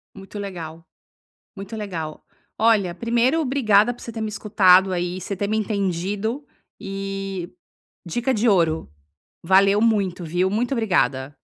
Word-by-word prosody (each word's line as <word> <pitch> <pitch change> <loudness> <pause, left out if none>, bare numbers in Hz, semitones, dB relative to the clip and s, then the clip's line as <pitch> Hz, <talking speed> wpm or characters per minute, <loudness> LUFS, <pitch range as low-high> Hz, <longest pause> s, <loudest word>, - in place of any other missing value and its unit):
Muito 195 +1 -9
legal, 165 -5 -7 0.7
muito 200 +2 -8
legal. 170 -8 -6 0.3
Olha, 215 -5 +3
primeiro, 240 - +1
obrigada 245 -6 +3
por 240 - -17
você 235 - -7
ter 225 -1 -6
me 220 - -2
escutado 195 -3 +4
aí, 180 0 -2
você 200 - -5
ter 200 +2 -2
me 215 +1 0
entendido 205 - -2 0.3
e 195 -2 -5 0.6
dica 240 +10 -1
de 230 +1 +1
ouro, 165 - +2 0.5
valeu 195 +3 +4
muito, 200 -6 +1
viu 175 +3 0
muito 235 +6 -1
obrigada. 145 - 0
195 Hz, 135 wpm, -22 LUFS, 180-220 Hz, 0.7 s, escutado